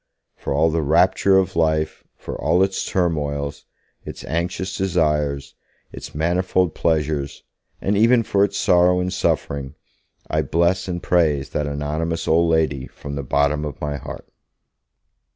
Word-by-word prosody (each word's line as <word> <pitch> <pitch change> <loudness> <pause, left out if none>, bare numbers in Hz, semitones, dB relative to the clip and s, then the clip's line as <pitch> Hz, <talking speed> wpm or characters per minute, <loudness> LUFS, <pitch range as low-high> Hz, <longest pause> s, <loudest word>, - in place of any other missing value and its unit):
For - - -6
all 80 +4 +3
the 80 +1 0
rapture 90 +5 +3
of 95 -2 +1
life, 80 -1 0
for - - -7
all 90 +2 +2
its 95 0 -1
turmoils, 70 -5 -2 0.4
its - - -8
anxious 90 +3 -2
desires, 75 -7 0 0.4
its - - -9
manifold 90 +2 +1
pleasures, 75 -3 -1 0.4
and 100 - 0
even 115 +3 +4
for 100 -2 +2
its 100 0 0
sorrow 90 0 +4
and 90 +1 -2
suffering, 70 -6 -1 0.5
I - - 0
bless 85 +4 +1
and 85 -1 -4
praise 75 -6 +1
that 75 -1 -1
anonymous 75 +3 -2
old 85 +1 +3
lady 75 -5 +1
from 70 - -9
the 70 - -3
bottom 70 +2 +1
of 75 -2 -6
my 75 -1 -3
heart. - - -9
80 Hz, 145 wpm, -21 LUFS, 75-90 Hz, 0.5 s, even